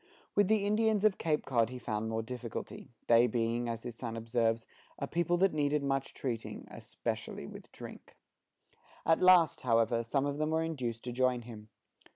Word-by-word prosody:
With 205 -1 +4
the 210 -1 +2
Indians 215 0 +2
of 210 -3 +3
Cape 155 -2 0
Cod 115 -4 +2
he 125 - -6
found 110 -2 -3
more 110 0 -1
difficulty, 125 0 -6 0.2
they 120 +1 +6
being, 115 +1 -1
as 115 0 -4
his 120 -1 -5
son 115 0 -5
observes, 115 0 0 0.3
"a - - -2
people 175 +1 0
that 190 0 +3
need 150 0 +1
much 135 -1 -1
treating, 115 -4 -4
especially - - -5
with - - -11
drink." - - -11 0.9
At 165 - +3
last, 180 -3 +6
however, 115 -1 +2
some 135 +4 0
of 145 +1 -2
them 155 0 +1
were 160 +1 +1
induced 125 -8 -3
to 125 - -4
join 125 -1 +1
him. 110 -2 -11
125 Hz, 180 wpm, -32 LUFS, 115-160 Hz, 0.9 s, they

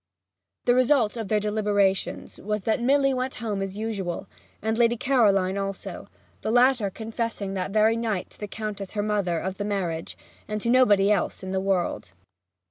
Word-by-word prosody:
The 245 - +5
result 250 -3 +3
of 225 -3 -4
their 215 +1 +2
deliberations 205 -2 0
was 210 0 -3
that 220 +3 +1
Milly 275 +2 +3
went 255 +1 -2
home 210 -4 -3
as 195 0 -4
usual, 200 -6 -3 0.3
and 220 +1 -1
Lady 235 0 +3
Caroline 200 -7 +2
also, 195 0 -5 0.3
the - - -2
latter 245 -2 +4
confessing 220 -1 -4
that 190 -1 -2
very 215 +2 +3
night 220 -5 -2
to - - -19
the 210 - -4
Countess 205 -2 -5
her 205 -1 -1
mother 200 -5 0
of 190 +3 -4
the - - -1
marriage, 180 -6 -3 0.3
and 215 0 -2
to 235 +3 0
nobody 210 -6 +5
else 200 -1 0
in 185 - -5
the 190 0 0
world. 185 - -1
210 Hz, 175 wpm, -25 LUFS, 195-230 Hz, 0.3 s, The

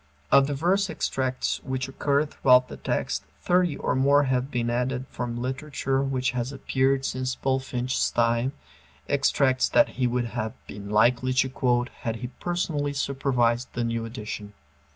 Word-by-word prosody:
Of 140 0 +6
the 145 - -2
verse 190 +6 +1
extracts 130 -1 -1
which 130 0 -3
occur 140 +2 +1
throughout 130 -3 +4
the - - -8
text, - - -2 0.2
thirty 175 -4 +2
or - - -1
more 140 +2 +4
have 130 -1 0
been 120 -3 -1
added 125 +1 -1
from 120 -1 -4
literature 135 +1 -2
which 135 -1 0
has 125 0 -3
appeared 135 0 0
since 130 0 -2
Bulfinch's 130 -1 -1
time, 120 +3 +1 0.5
extracts 135 -2 +2
that 295 - +4
he 130 -1 0
would 120 0 0
have 110 0 -2
been 100 0 -8
likely 120 +4 +3
to 130 +1 +2
quote 125 -2 +1
had 115 -1 -3
he 125 +1 -6
personally 160 -5 -1
supervised 130 -3 0
the 120 - -1
new 115 0 -1
edition. 105 -3 -6
130 Hz, 155 wpm, -26 LUFS, 120-140 Hz, 0.5 s, Of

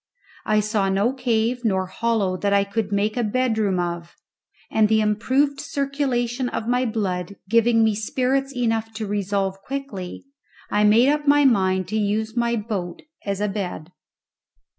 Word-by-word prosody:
I 215 -1 +3
saw 210 -2 0
no 200 +6 +1
cave 245 -1 0
nor 190 -4 +1
hollow 205 -1 0
that 200 +2 -1
I 200 0 +4
could 205 +1 -3
make 205 +2 0
a 245 - 0
bedroom 220 -4 +1
of, 170 -1 -4 0.6
and 215 -1 +3
the 220 0 +4
improved 260 +7 +1
circulation 265 -3 -1
of 225 - -4
my 250 +1 +1
blood 200 -4 -2
giving 230 +1 +4
me 220 -1 +3
spirits 260 +6 -1
enough 225 -2 0
to 220 0 -3
resolve 195 -1 -2
quickly, 270 -11 -6 0.5
I 210 0 +3
made 230 +5 +5
up 295 0 0
my 290 0 +5
mind 190 -7 +2
to 215 - -1
use 215 +2 -1
my 235 0 +1
boat 205 -6 -4 0.2
as 200 -1 -1
a 210 - 0
bed. 185 -5 -5
220 Hz, 160 wpm, -23 LUFS, 200-245 Hz, 0.6 s, made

